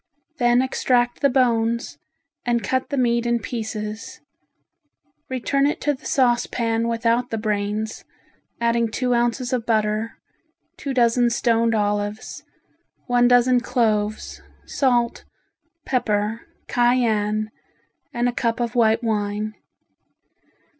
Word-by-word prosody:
Then 240 Hz, 0 st, +4 dB
extract 245 Hz, -2 st, 0 dB
the 280 Hz, -, +4 dB
bones 235 Hz, -3 st, +1 dB, 0.4 s
and 240 Hz, -1 st, 0 dB
cut 260 Hz, 0 st, -1 dB
the 280 Hz, -, -2 dB
meat 235 Hz, -1 st, +1 dB
in 235 Hz, 0 st, +2 dB
pieces, 220 Hz, -1 st, -5 dB, 1.1 s
return 275 Hz, +2 st, +1 dB
it 295 Hz, -, -2 dB
to 295 Hz, -, +1 dB
the 260 Hz, -, -9 dB
saucepan 235 Hz, -2 st, +1 dB
without 235 Hz, +1 st, 0 dB
the 225 Hz, -, -2 dB
brains, 210 Hz, 0 st, -2 dB, 0.6 s
adding 235 Hz, 0 st, +1 dB
two 250 Hz, +2 st, -1 dB
ounces 240 Hz, +1 st, 0 dB
of 235 Hz, -3 st, -2 dB
butter, 215 Hz, 0 st, 0 dB, 0.6 s
two 275 Hz, -2 st, -5 dB
dozen 240 Hz, 0 st, +3 dB
stoned 230 Hz, -1 st, +1 dB
olives, 205 Hz, 0 st, -2 dB, 0.6 s
one 245 Hz, -1 st, +3 dB
dozen 245 Hz, 0 st, +4 dB
cloves, 215 Hz, -4 st, -1 dB, 0.2 s
salt, 240 Hz, -3 st, 0 dB, 0.6 s
pepper, 220 Hz, -2 st, -1 dB, 0.2 s
cayenne, 220 Hz, -3 st, +1 dB, 0.6 s
and 240 Hz, 0 st, 0 dB
a -, -, +1 dB
cup 230 Hz, -1 st, -1 dB
of 235 Hz, -1 st, -2 dB
white 230 Hz, -1 st, +3 dB
wine. 210 Hz, -1 st, -1 dB
235 Hz, 115 wpm, -22 LUFS, 220-245 Hz, 1.1 s, Then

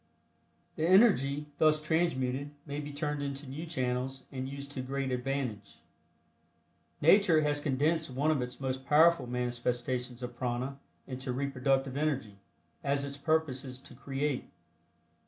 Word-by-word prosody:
The 160 Hz, -, +1 dB
energy 150 Hz, -, +5 dB
thus 155 Hz, -1 st, +5 dB
transmuted 145 Hz, -4 st, 0 dB, 0.2 s
may 145 Hz, -1 st, -4 dB
be 145 Hz, 0 st, -5 dB
turned 145 Hz, 0 st, -2 dB
into 140 Hz, 0 st, -4 dB
new 150 Hz, +6 st, -6 dB
channels 130 Hz, -3 st, -2 dB
and 130 Hz, 0 st, -4 dB
used 140 Hz, 0 st, -7 dB
to 135 Hz, -, -4 dB
great 135 Hz, +1 st, -2 dB
advantage. 125 Hz, -5 st, -3 dB, 1.2 s
Nature 170 Hz, 0 st, +6 dB
has 145 Hz, -1 st, +1 dB
condensed 150 Hz, +3 st, +1 dB
one 140 Hz, +5 st, +1 dB
of 145 Hz, -4 st, +1 dB
its 125 Hz, 0 st, -5 dB
most 130 Hz, -1 st, -2 dB
powerful 160 Hz, -1 st, +5 dB
manifestations 125 Hz, 0 st, -2 dB
of 125 Hz, 0 st, -5 dB
prana 125 Hz, +3 st, -2 dB, 0.3 s
into 130 Hz, 0 st, -5 dB
reproductive 135 Hz, 0 st, 0 dB
energy, 135 Hz, -10 st, -1 dB, 0.4 s
as 140 Hz, 0 st, +1 dB
its 140 Hz, 0 st, -5 dB
purpose 150 Hz, -2 st, 0 dB
is 130 Hz, -1 st, -7 dB
to -, -, -12 dB
create. 140 Hz, 0 st, -2 dB
140 Hz, 135 wpm, -31 LUFS, 130-150 Hz, 1.2 s, Nature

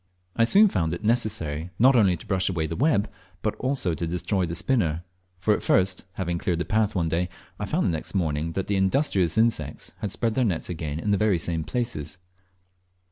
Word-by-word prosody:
I 115 Hz, -, +4 dB
soon 205 Hz, -, +7 dB
found 80 Hz, -, 0 dB
it 85 Hz, -, -6 dB
necessary 105 Hz, -9 st, 0 dB
not 130 Hz, +3 st, +5 dB
only 95 Hz, -7 st, +4 dB
to -, -, -13 dB
brush 95 Hz, -2 st, +1 dB
away 85 Hz, -4 st, -1 dB
the 80 Hz, +1 st, -4 dB
web, 120 Hz, -, +2 dB, 0.4 s
but 110 Hz, -, 0 dB
also 130 Hz, -9 st, -1 dB
to 85 Hz, +1 st, -3 dB
destroy 90 Hz, +2 st, 0 dB
the 85 Hz, -, -4 dB
spinner; 85 Hz, -7 st, +1 dB, 0.3 s
for 100 Hz, +4 st, +2 dB
at -, -, -1 dB
first, 95 Hz, 0 st, +1 dB
having 85 Hz, -2 st, -2 dB
cleared 85 Hz, -1 st, -1 dB
the 85 Hz, -, -2 dB
path 110 Hz, -1 st, +1 dB
one 85 Hz, -3 st, +1 dB
day, 85 Hz, +2 st, 0 dB, 0.3 s
I -, -, -3 dB
found -, -, 0 dB
the -, -, +2 dB
next 80 Hz, +4 st, -5 dB
morning 80 Hz, -2 st, -1 dB
that 95 Hz, -, -2 dB
the 100 Hz, -, 0 dB
industrious 95 Hz, -, +1 dB
insects 110 Hz, -11 st, 0 dB
had 100 Hz, -, -3 dB
spread 115 Hz, +2 st, 0 dB
their 130 Hz, -, +1 dB
nets 90 Hz, -5 st, -1 dB
again 80 Hz, -3 st, -4 dB
in 105 Hz, +5 st, -1 dB
the 100 Hz, -, +3 dB
very 105 Hz, -4 st, +3 dB
same 80 Hz, 0 st, -1 dB
places. 95 Hz, -, -4 dB
95 Hz, 210 wpm, -25 LUFS, 80-110 Hz, 0.4 s, soon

